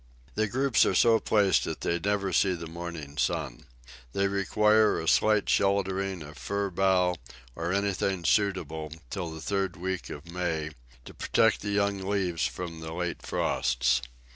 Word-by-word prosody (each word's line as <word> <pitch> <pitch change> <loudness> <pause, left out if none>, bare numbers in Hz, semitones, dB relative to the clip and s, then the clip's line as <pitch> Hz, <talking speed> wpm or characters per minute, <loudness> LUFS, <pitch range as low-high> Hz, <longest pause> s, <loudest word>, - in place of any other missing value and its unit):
The 110 +1 0
groups 130 +3 +3
are 95 - +1
so 115 +3 +5
placed 100 -5 +3
that - - -5
they 85 - 0
never 100 0 -1
see 95 +3 +3
the 85 -1 -7
morning 80 -3 -7
sun. 75 -8 -2 0.5
They 100 0 +1
require 105 +2 +3
a 80 - -5
slight 105 +4 +3
sheltering 95 -2 +1
of 75 -2 -11
fir 100 +8 -2
bough, 90 -1 +2 0.4
or 85 +1 -2
anything 95 -2 0
suitable, 80 -7 0 0.2
till 90 -4 -3
the 80 0 -8
third 95 -1 -1
week 95 +1 -4
of 75 +1 -8
May, 85 -4 -2 0.3
to - - -10
protect 115 -1 +2
the 105 - -4
young 100 0 +1
leaves 95 -6 0
from 85 -2 -6
the 80 0 -6
late 90 0 -3
frosts. - - +1
95 Hz, 160 wpm, -28 LUFS, 85-100 Hz, 0.5 s, so